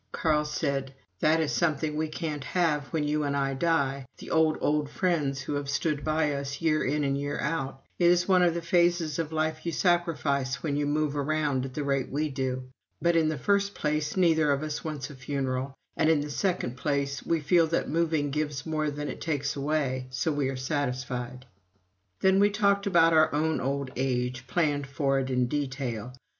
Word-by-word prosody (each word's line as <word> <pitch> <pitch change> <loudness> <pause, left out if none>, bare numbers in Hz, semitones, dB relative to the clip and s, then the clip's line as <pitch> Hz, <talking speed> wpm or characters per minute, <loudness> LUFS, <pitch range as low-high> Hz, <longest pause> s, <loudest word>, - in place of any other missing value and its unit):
Carl 150 -2 +1
said: 140 -3 -2 0.2
"That 155 +1 +3
is 160 -2 0
something 155 -2 0
we 155 +1 0
can't 155 -2 -4
have 150 -3 0
when 160 -2 -1
you 150 +1 0
and 140 -1 0
I 135 -1 0
die 140 -3 0
the - - -9
old, 160 -1 +3
old 150 -1 +1
friends 150 -6 0
who 135 - -4
have 145 -1 -3
stood 145 0 -1
by 155 -1 +1
us 140 0 -4
year 155 -2 +2
in 150 +3 0
and 140 -1 +1
year 145 +1 -3
out. 135 -4 -2 0.2
It 175 - +3
is 175 0 +3
one 185 -2 +5
of 175 -2 +3
the 170 - -3
phases 170 -2 +2
of 160 -2 -2
life 155 0 -1
you 170 - -2
sacrifice 150 -7 0
when 145 -3 -1
you 145 0 0
move 150 0 0
around 145 -2 0
at 130 - -8
the 150 - -2
rate 135 -2 0
we 150 +3 -1
do. 130 -2 -2 0.4
But 170 0 +2
in 160 -2 +3
the 155 - -2
first 200 +7 +1
place, 150 +2 -1
neither 160 -5 +4
of 140 +1 0
us 155 -1 -4
wants 150 -3 -5
a - - -10
funeral, 135 0 -3 0.2
and 160 - +2
in 160 -3 +4
the 145 0 -5
second 175 -8 -1
place, 140 0 -1
we 165 - +1
feel 165 +2 +3
that 165 - 0
moving 160 -3 0
gives 150 -2 -2
more 155 -1 -1
than 145 0 -4
it - - -6
takes 150 -4 -1
away 140 -3 -1
so 130 +5 -1
we 145 -2 0
are 135 - -4
satisfied." 130 -2 -3 0.8
Then 190 0 +4
we 205 +1 +5
talked 200 -1 +2
about 165 -3 +5
our 155 -1 +5
own 160 +1 +1
old 140 0 -2
age 125 -1 -1
planned 145 -1 0
it 135 -2 +1
in 125 -1 +2
detail. 130 -4 -3
150 Hz, 200 wpm, -28 LUFS, 135-160 Hz, 0.8 s, one